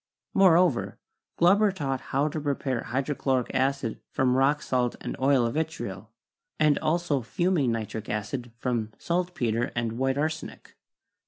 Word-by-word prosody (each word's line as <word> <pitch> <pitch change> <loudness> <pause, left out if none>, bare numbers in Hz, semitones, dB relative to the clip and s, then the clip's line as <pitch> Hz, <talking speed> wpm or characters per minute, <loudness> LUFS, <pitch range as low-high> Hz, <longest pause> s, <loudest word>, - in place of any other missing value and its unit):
Moreover, 180 -7 +4 0.4
Glauber 200 +4 +5
taught 135 -8 -3
how 140 +3 +1
to 155 - -4
prepare 135 -4 -2
hydrochloric 130 0 -1
acid 135 -3 0
from 125 -1 +1
rock 140 +3 +2
salt 125 -2 0
and - - -5
oil 135 -2 +3
of 115 - -1
vitriol, 140 -10 -4 0.5
and 150 -2 +4
also 160 -4 0
fuming 170 - +1
nitric 110 -1 -4
acid 115 +4 -3
from 115 -3 -2
saltpeter 170 -10 -1
and 115 0 -2
white 135 0 +1
arsenic. 155 +2 -4
135 Hz, 135 wpm, -27 LUFS, 120-155 Hz, 0.5 s, Glauber